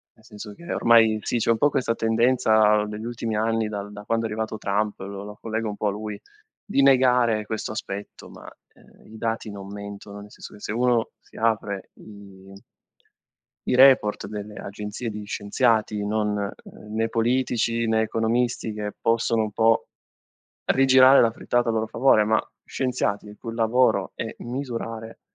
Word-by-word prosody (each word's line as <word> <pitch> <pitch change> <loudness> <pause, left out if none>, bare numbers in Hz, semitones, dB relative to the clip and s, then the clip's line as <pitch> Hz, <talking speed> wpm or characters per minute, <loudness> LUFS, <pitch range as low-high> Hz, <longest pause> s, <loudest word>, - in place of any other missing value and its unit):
Nel 110 - -24
senso 105 -3 -10
che, 170 +9 -9
ormai, 115 -2 +5
sì, 120 - -1
c'è 115 - -1
un 115 - +2
po' 145 - +3
questa 125 -5 0
tendenza 110 -2 +3
degli 105 +1 -6
ultimi 115 -2 -3
anni, 115 0 0
dal 105 -1 -6
da 105 0 -9
quando 115 +1 0
è - - -2
arrivato 110 0 -3
Trump, 105 +1 -1
lo 100 +1 -7
lo 105 0 -10
collego 110 0 -3
un 105 - -5
po' 105 - -1
a - - +1
lui, 105 0 -6 0.4
di 140 - +1
negare 125 -5 +4
questo 110 0 -4
aspetto, 100 -2 -7
ma, - - -13 0.3
ehm, - - -22
i 110 - -12
dati 115 -1 -3
non 100 -1 -9
mentono. 100 0 -8
Nel 105 - -13
senso - - -11
che, 105 - -13
se - - -4
uno 120 -1 +1
si - - -25
apre 105 -3 -1
i 100 -2 -14 1.2
i - - +2
report 130 -5 +5
delle 105 0 -7
agenzie 105 +3 -6
di 105 0 -7
scienziati, 105 0 0
non, 105 0 0
ehm, 105 +1 -7
né 115 0 0
politici 115 -1 0
né 110 0 +2
economisti, 115 +1 0
che 105 -1 -5
possono 115 -1 +1
un 105 - -4
po' 115 +2 +2 0.8
rigirare 130 0 +6
la 115 - +3
frittata 120 +1 0
a - - 0
loro 110 0 0
favore, 115 -2 +3
ma 110 +1 +2 0.2
scienziati, 125 -6 -2
il 105 - -12
cui 115 -2 -7
lavoro 115 +3 +2
è - - -5
misurare, 115 -3 -6
110 Hz, 175 wpm, -24 LUFS, 105-115 Hz, 1.2 s, rigirare